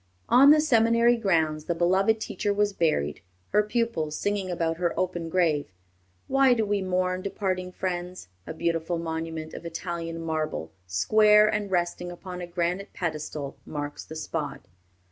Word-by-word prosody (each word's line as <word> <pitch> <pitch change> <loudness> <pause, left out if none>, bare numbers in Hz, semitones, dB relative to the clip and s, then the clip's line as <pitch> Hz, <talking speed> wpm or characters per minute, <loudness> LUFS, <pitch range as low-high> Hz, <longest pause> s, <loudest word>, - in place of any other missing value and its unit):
On 270 +3 +7
the 305 +1 +7
seminary 235 -3 +4
grounds 160 -8 +1
the 170 - -1
beloved 190 +6 +2
teacher 210 -1 -2
was 205 0 +1
buried, 115 - 0 0.3
her 210 - +4
pupils 210 -8 -1
singing 205 -2 -1
about 165 -2 -1
her 175 -1 -1
open 175 -2 -2
grave, 160 - +1 0.6
"Why 270 -2 +4
do 225 -2 +1
we 205 -1 0
mourn 185 0 0
departing 185 -2 -2
friends?" 180 - -4 0.2
A - - -4
beautiful 165 +1 -1
monument 160 -1 -4
of - - -8
Italian 165 0 -5
marble, 155 - -3 0.2
square, 210 - +5
and 210 -1 -1
resting 175 -1 -1
upon 180 0 -8
a 175 - -5
granite 175 +3 -2
pedestal, 155 -4 -4
marks 145 -1 -5
the 160 - -10
spot. 150 -3 -4
175 Hz, 150 wpm, -26 LUFS, 160-205 Hz, 0.6 s, On